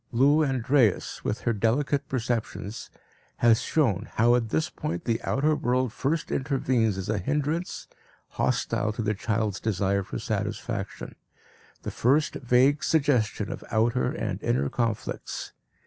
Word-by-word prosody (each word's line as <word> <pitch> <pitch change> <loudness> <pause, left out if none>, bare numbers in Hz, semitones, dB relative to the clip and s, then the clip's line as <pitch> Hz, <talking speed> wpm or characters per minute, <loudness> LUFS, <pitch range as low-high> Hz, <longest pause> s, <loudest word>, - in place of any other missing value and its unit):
Lou 140 +6 +4
Andreas, 130 -5 +1
with 110 - -2
her 120 - +1
delicate 130 +7 0
perceptions, 115 -4 -3 0.5
has 120 0 +4
shown 115 - 0
how 120 +2 +4
at 120 -2 +1
this 80 -3 +1
point 85 +1 -5
the 115 -1 0
outer 150 +3 +1
world 125 -3 0
first 150 +5 -1
intervenes 130 -6 +1
as 95 +1 -4
a 105 -1 0
hindrance, 150 - -2 0.4
hostile 105 - 0
to 110 - -3
the 105 0 +1
child's 110 -1 -1
desire 100 -2 0
for 75 -10 -6
satisfaction - - -4 0.7
the - - -4
first 145 +6 +2
vague 130 +3 +3
suggestion 130 -9 +1
of - - -6
outer 115 +3 +1
and - - -3
inner 70 +3 +1
conflicts. 115 -3 -3
120 Hz, 135 wpm, -26 LUFS, 110-135 Hz, 0.7 s, Lou